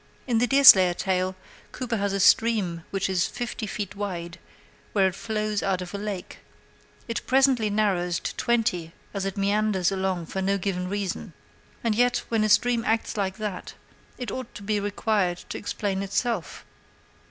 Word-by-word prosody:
In 235 -3 +1
the 245 - +2
Deerslayer 195 -11 +8
tale 185 0 -1 0.4
Cooper 240 -3 -3
has 200 -1 0
a 195 - -1
stream 200 -5 +3
which 195 -1 -1
is 185 -2 +1
fifty 240 -2 -5
feet 205 -1 -5
wide 175 -4 -5 0.5
where 195 -2 +4
it - - -9
flows 215 -1 -2
out 190 -2 0
of 180 0 -7
a 200 - -4
lake; 200 -3 -6 0.7
it 230 - -4
presently 260 -4 +3
narrows 190 -5 +1
to - - -4
twenty 220 -9 0 0.2
as 195 -1 -3
it 195 0 -4
meanders 200 -2 +1
along 190 -3 -1
for 190 - -4
no 195 +1 +1
given 180 -1 -2
reason; 200 -1 -4 0.5
and 230 -2 +2
yet 245 +3 +2
when 225 -2 +1
a 215 - +1
stream 235 +2 +3
acts 225 -1 0
like 190 -2 -2
that 210 -4 -5 0.4
it 245 -5 -5
ought 255 -2 -6
to 205 - -9
be 210 +1 0
required 205 -3 0
to - - -4
explain 200 -2 -2
itself. 200 -2 -2
200 Hz, 170 wpm, -25 LUFS, 190-225 Hz, 0.7 s, Deerslayer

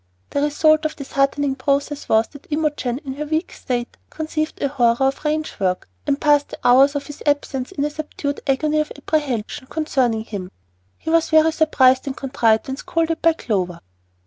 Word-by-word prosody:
The 285 - 0
result 310 +1 +3
of 310 - -2
this 280 - -9
"heartening," 275 0 +1
process 280 +1 -1
was 220 +1 +4
that 285 -1 -14
Imogen, 295 -5 -1
in 265 - -4
her 300 - -3
weak 315 +3 -1
state, 240 -1 -4
conceived 310 0 -3
a - - +1
horror 240 -4 +2
of 270 +1 +1
ranch 310 0 -2
work, 185 -2 -1 0.2
and 280 - +1
passed 290 -1 +3
the - - -8
hours 270 +4 +6
of 285 - -2
his 295 - -10
absence 280 -2 0
in 290 -7 -1
a 295 - -2
subdued 295 -1 -4
agony 300 +3 +1
of 305 - -1
apprehension 275 -4 -2
concerning 260 -8 0
him. 200 -5 -6 0.5
He 320 - -4
was 330 0 +3
very 315 0 +5
surprised 265 -4 +3
and 270 - -4
contrite 230 -5 +1
when 265 0 -4
scolded 330 +2 -1
by 330 0 +5
Clover. 185 - -2
285 Hz, 185 wpm, -21 LUFS, 260-310 Hz, 0.5 s, hours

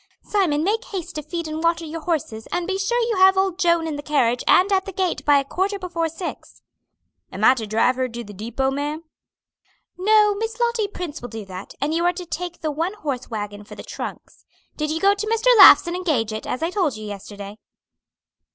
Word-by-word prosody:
Simon 335 -8 +1
make 440 +6 0
haste 375 -5 -6
to 305 - -4
feed 330 +2 -5
and 310 +1 -4
water 335 0 +1
your 320 +1 -6
horses 290 -10 -3
and 355 -1 -1
be 385 +1 -2
sure 475 +5 0
you 460 -3 -1
have 380 0 +6
old 380 -1 +1
Joan 340 -3 +3
in 310 -2 -3
the - - -5
carriage 250 -5 +1
and 375 +3 +5
at 385 0 +2
the 390 - -6
gate 370 -1 -2
by 290 -1 +6
a 275 - 0
quarter 385 +7 -1
before 345 -3 -2
six." 335 +2 -8 0.7
"Am - - -5
I - - +7
to 230 -4 -5
drive 225 +4 +2
her 255 -1 -1
to 235 0 -6
the 205 -1 -11
depot, 235 +7 -2
ma'am?" 295 +3 -3 1.0
"No, 420 +1 +4
Miss 450 +4 -4
Lottie 470 -3 +1
Prince 355 -6 -7
will 245 - -7
do 220 -1 -7
that, 185 0 -9
and 290 +3 -1
you 335 +1 0
are 350 0 +3
to 360 0 -7
take 350 +1 -5
the 310 -2 -1
one 330 +6 -2
horse 280 - -4
wagon 205 -2 -5
for - - -12
the - - -9
trunks. - - -8 0.3
Did 305 0 -2
you 320 +1 -1
go 395 +2 +4
to 410 +1 -4
Mr. 455 +3 +3
Laugh's - - +10
and 345 +1 -3
engage 290 -12 -1
it, 215 - -6
as 255 - -3
I 335 - 0
told 345 - 0
you 215 - -8
yesterday?" 205 0 -8
330 Hz, 225 wpm, -22 LUFS, 255-380 Hz, 1.0 s, Laugh's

